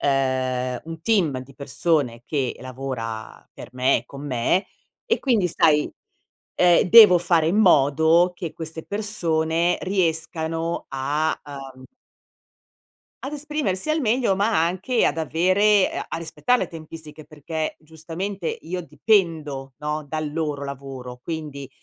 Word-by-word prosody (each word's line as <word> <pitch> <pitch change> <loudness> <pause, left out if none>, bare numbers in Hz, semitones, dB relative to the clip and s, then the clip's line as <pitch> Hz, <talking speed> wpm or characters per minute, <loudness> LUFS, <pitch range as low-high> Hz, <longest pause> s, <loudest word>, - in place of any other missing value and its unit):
ehm 130 -2 +1 0.3
un 165 0 -8
team 165 - +1
di 130 +1 -13
persone 140 -3 -1
che 135 -4 -2
lavora 125 -4 -6
per - - -11
me 130 +1 +2
e - - -11
con 140 +1 -9
me, 135 - 0 0.4
e 460 -2 +1
quindi 225 -9 +1
sai, 155 -3 +3 0.7
ehm, 175 -1 +5
devo 215 -5 +10
fare 170 -2 +2
in 185 - +1
modo 160 -1 +4
che 170 -2 -6
queste 160 0 -7
persone 170 -5 0
riescano 165 -2 -1
a, 145 +4 -1 0.4
uhm 130 0 -14 1.4
ad 275 - -5
esprimersi 300 -6 -2
al 315 - +1
meglio, 230 -5 +1
ma 205 -4 +2
anche 190 +8 0
ad 155 - +1
avere 185 +5 +3
a - - -5
a - - -4
rispettare 165 +9 0
le - - -2
tempistiche, 155 -2 -10
perché 155 +1 -4
giustamente 165 +4 -6 0.2
io 180 +3 -4
dipendo, 160 - 0
no, 150 0 -3
dal 155 0 -4
loro 150 -3 -2
lavoro, 135 -3 -8
quindi, 150 -3 -6
160 Hz, 130 wpm, -23 LUFS, 140-185 Hz, 1.4 s, devo